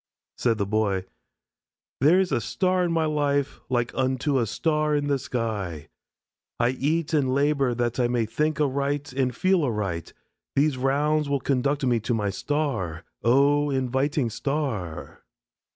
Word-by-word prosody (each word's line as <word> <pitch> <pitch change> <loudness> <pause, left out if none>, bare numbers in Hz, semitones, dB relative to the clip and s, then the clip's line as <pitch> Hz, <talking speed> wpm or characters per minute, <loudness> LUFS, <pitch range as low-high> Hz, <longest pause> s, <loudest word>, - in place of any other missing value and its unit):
Said 115 -2 +1
the 100 - 0
Boy: 100 -2 0 0.9
"There 155 +8 +5
is 190 -1 +1
a - - +1
star 185 - +1
in 175 - 0
my 165 -1 +1
life 145 -2 0
like 120 -2 0
unto 130 +2 0
a 115 - 0
star 150 - 0
in 145 -1 0
the 140 -1 +1
sky. 100 - -3 0.7
I 120 - +3
eat 155 +5 -1
and 135 -4 +2
labor 140 -3 +2
that 120 +1 -1
I 120 - +3
may 120 -2 0
think 150 +8 -1
aright 140 0 -1
and 130 -1 +1
feel 185 +1 +2
aright. 100 -9 -2 0.4
These 145 0 +3
rounds 145 +3 +1
will 140 -1 +1
conduct 140 +2 0
me 120 -2 +2
to 115 +2 -1
my 105 -2 -1
star. 110 - -2 0.2
Oh, 140 +4 +4
inviting 130 -1 0
star!" 125 - -3
135 Hz, 150 wpm, -25 LUFS, 115-150 Hz, 0.9 s, There